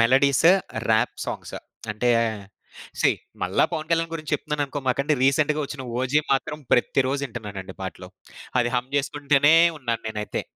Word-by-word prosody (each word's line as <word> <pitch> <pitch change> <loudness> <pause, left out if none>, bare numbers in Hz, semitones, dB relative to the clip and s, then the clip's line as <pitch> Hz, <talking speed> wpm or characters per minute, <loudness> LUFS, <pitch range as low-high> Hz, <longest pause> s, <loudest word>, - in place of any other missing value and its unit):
Melodies, 135 +6 +4 0.4
rap 110 +3 +2
songs. - - -5 0.4
అంటే, 120 +3 +1 0.9
see - - +5 0.3
మళ్ళా 90 +1 +2
'పవన్ 160 -1 -3
కళ్యాణ్' 165 0 +1
గురించి 155 -1 -6
చెప్తున్నాననుకోమాకండి. 145 -1 -1
రీసెంటుగా 150 +3 +2
ఒచ్చిన 135 -2 -7 0.2
'ఓజీ' 135 +4 +2
మాత్రం 135 +3 -1
ప్రతి 125 +2 +3
రోజిటన్నానండి 110 -9 -5
పాటలు. 90 -1 -7 0.5
అది 120 0 0
హమ్ 125 +2 -3
చేసుకుంటూనే 145 +1 +3 0.2
ఉన్నాను 120 -3 -2
నేనైతే. 105 -1 -4
135 Hz, 125 wpm, -24 LUFS, 120-150 Hz, 0.9 s, see